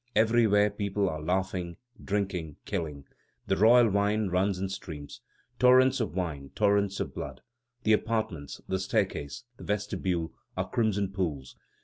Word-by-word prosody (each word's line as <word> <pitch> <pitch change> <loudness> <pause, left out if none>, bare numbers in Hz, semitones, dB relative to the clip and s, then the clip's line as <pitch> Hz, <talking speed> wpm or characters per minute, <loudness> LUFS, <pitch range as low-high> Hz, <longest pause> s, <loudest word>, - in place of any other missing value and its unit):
Everywhere 110 -2 +4
people 100 -1 -1
are 80 -2 -4
laughing, 90 0 -2 0.3
drinking, 95 -7 -2
killing. 75 -4 -4 0.4
The - - +1
royal 115 +4 +6
wine 100 0 +1
runs 95 +2 +1
in 95 +1 -2
streams. 80 -7 -8 0.4
Torrents 130 +1 +6
of 105 -8 -2
wine, 75 -7 -3
torrents 100 -1 +2
of - - -3
blood. 65 -2 -6 0.4
The 110 - +4
apartments, 110 -10 -1
the 95 - -1
staircase, 70 -6 -1
the - - -11
vestibule, 95 -5 -2 0.2
are - - -1
crimson 105 -5 0
pools. 80 -9 -3
95 Hz, 135 wpm, -29 LUFS, 85-105 Hz, 0.4 s, royal